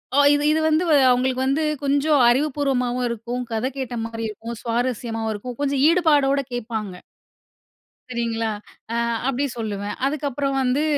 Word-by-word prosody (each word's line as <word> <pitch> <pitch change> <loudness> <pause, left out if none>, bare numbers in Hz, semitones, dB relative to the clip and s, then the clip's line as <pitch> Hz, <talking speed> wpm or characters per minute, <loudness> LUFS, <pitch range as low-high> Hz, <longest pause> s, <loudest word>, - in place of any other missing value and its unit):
ஓ 285 - +5
இது 290 0 +1
இது 315 - +2
வந்து, 315 +3 +2 0.3
அவுங்களுக்கு 255 +1 +1
வந்து, 280 +4 +1 0.2
கொஞ்சம் 285 +1 +2
அறிவுபூர்வமாவும் 255 -2 0
இருக்கும், 235 +2 -4
கதை 225 +4 -1
கேட்ட 250 -2 -4
மாரி 225 0 -5
இருக்கும், 225 +2 -7
சுவாரஸ்யமாவும் 230 -1 -2
இருக்கும், 240 +3 -7
கொஞ்சம் 275 -1 0
ஈடுபாடோட 295 -5 +3
கேப்பாங்க. 220 -5 -4 1.2
சரிங்களா! 230 -2 -1 0.4
அ, - - -1 0.3
அப்பிடி 270 +2 0
சொல்லுவேன். 205 -2 -4
அதுக்கப்புறம் 280 -1 -2
வந்து 260 +3 +1
250 Hz, 130 wpm, -22 LUFS, 230-280 Hz, 1.2 s, ஓ